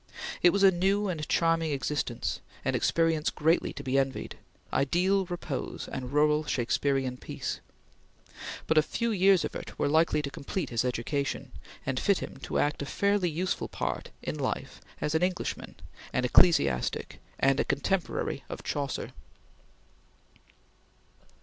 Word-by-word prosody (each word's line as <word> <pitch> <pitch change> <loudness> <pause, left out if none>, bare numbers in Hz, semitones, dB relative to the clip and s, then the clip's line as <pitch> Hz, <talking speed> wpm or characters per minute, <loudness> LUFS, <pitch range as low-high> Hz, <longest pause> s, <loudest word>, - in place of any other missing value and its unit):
It 175 - +7
was 200 +3 +2
a 195 - +8
new 195 +3 +1
and 155 -4 -3
charming 165 -1 +2
existence; 135 -3 -2 0.3
an - - +1
experience 165 -2 +2
greatly 160 +3 +2
to - - -7
be 135 +1 +2
envied 135 -1 -2 0.4
ideal 185 +7 +2
repose 170 -6 -4
and 125 -1 -5
rural 150 +1 +3
Shakespearian 135 -1 0
peace - - -5 1.1
but 160 - +4
a - - +6
few 230 +9 -1
years 195 -3 +4
of - - -5
it - - -7
were - - +1
likely 155 0 +3
to 140 - -3
complete 140 +6 -4
his 115 0 +1
education, 130 +3 -2 0.3
and 130 -1 0
fit 200 -2 +3
him - - -6
to 135 - -3
act 145 0 +1
a 140 - -3
fairly 200 -1 +2
useful 175 +4 -1
part - - -3
in - - -3
life - - -3 0.2
as 150 - -1
an 160 - +2
Englishman, 180 0 -2 0.4
an 125 - +1
ecclesiastic, 70 - +3 0.2
and 135 +1 +3
a - - +4
contemporary 170 +6 -1
of - - -6
Chaucer. 140 -2 -3
155 Hz, 145 wpm, -29 LUFS, 135-180 Hz, 1.1 s, a